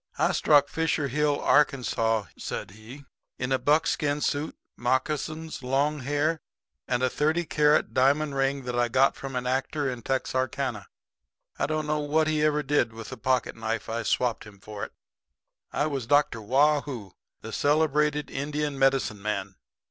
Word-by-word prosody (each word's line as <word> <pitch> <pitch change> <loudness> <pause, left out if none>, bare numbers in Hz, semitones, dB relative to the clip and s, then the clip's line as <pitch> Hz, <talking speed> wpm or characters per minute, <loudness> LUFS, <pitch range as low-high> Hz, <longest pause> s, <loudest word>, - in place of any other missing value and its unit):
"I - - +2
struck 145 -2 +4
Fisher 160 -3 -1
Hill, 145 +1 +1
Arkansaw," 115 -6 +2
said - - -5
he, 115 +7 -12 0.3
"in 125 +1 -3
a 130 - +2
buckskin 150 -1 +1
suit, 145 +1 -2 0.2
moccasins, 155 +6 -2
long 140 +4 0
hair 145 +4 0 0.5
and 125 +1 0
a - - +4
thirty 155 +6 0
carat 150 -1 +2
diamond 140 +3 +2
ring 135 0 0
that 125 0 -4
I 120 0 +2
got 130 +3 +3
from 135 -1 -7
an 125 0 -2
actor 135 +3 -1
in 125 -1 -7
Texarkana. 130 0 -2 0.7
I - - +1
don't 155 0 -1
know 150 0 0
what 150 +2 +1
he 155 -1 +1
ever 150 -1 +2
did 130 -5 +1
with 115 0 -8
the - - -7
pocket 125 +2 0
knife 115 0 -3
I 115 +1 -2
swapped 120 0 0
him 105 -2 -14
for 105 +1 -8
it. - - -5 0.8
"I 145 - 0
was 135 -6 -3
Dr. 145 -4 +2
Waugh 145 +7 +3
hoo, 120 -10 -7 0.3
the - - -8
celebrated 150 0 +1
Indian 145 0 -3
medicine 135 -6 +2
man. 100 -2 -3
140 Hz, 165 wpm, -27 LUFS, 125-150 Hz, 0.8 s, struck